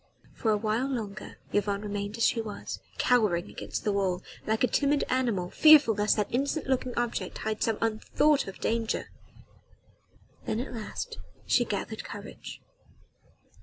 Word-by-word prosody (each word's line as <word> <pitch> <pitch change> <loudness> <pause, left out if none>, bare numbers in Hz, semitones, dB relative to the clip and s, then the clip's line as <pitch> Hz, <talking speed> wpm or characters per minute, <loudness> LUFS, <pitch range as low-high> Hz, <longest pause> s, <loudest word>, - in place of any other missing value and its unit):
For 225 - -1
awhile 215 +4 +1
longer 215 -6 -5 0.2
Yvonne 205 0 0
remained 205 +1 -4
as 230 - +3
she 230 - +2
was 215 -2 -6 0.2
cowering 210 -7 +2
against - - -5
the 210 - +1
wall 190 -2 0 0.2
like 220 +2 +1
a - - +5
timid 285 +2 +2
little - - 0
animal, 215 -9 0
fearful 305 -7 +7
lest 210 +1 +2
that 210 0 -1
innocent 280 +4 0
looking 255 -2 -1
object 240 -1 -2
hid 220 -1 -2
some 225 -2 +1
unthought 225 +6 +2
of 195 - -7
danger. 225 0 -1 1.3
Then 215 - -1
at 250 - -5
last 350 - -5 0.3
she - - +3
gathered - - -4
courage. - - -9
220 Hz, 150 wpm, -28 LUFS, 205-250 Hz, 1.3 s, fearful